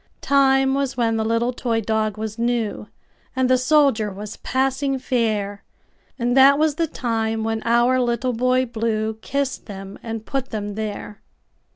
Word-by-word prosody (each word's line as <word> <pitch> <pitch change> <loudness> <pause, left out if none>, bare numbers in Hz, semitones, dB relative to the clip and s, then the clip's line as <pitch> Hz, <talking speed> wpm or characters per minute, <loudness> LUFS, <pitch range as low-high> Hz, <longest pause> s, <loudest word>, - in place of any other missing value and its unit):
Time 270 -1 +3
was 275 -2 -1
when 230 -2 +1
the 220 - 0
little 230 +2 0
toy 235 -2 -1
dog 220 -1 -1
was 220 +1 -5
new, 235 -3 -1 0.5
And 260 -1 +2
the 255 - +4
soldier 265 -6 +3
was 205 +2 -8
passing 270 +1 0
fair; 215 -6 -1 0.5
And 245 0 0
that 275 +1 +7
was 310 0 +2
the 330 +2 -1
time 225 -4 -2
when 225 0 -1
our 240 +2 +3
Little 245 +1 0
Boy 255 +2 +2
BlueKissed 225 +3 -2
them 195 -1 -9
and 225 -1 -6
put 270 -1 -3
them 205 -2 -4
there. 210 -1 -6
235 Hz, 155 wpm, -22 LUFS, 220-260 Hz, 0.5 s, that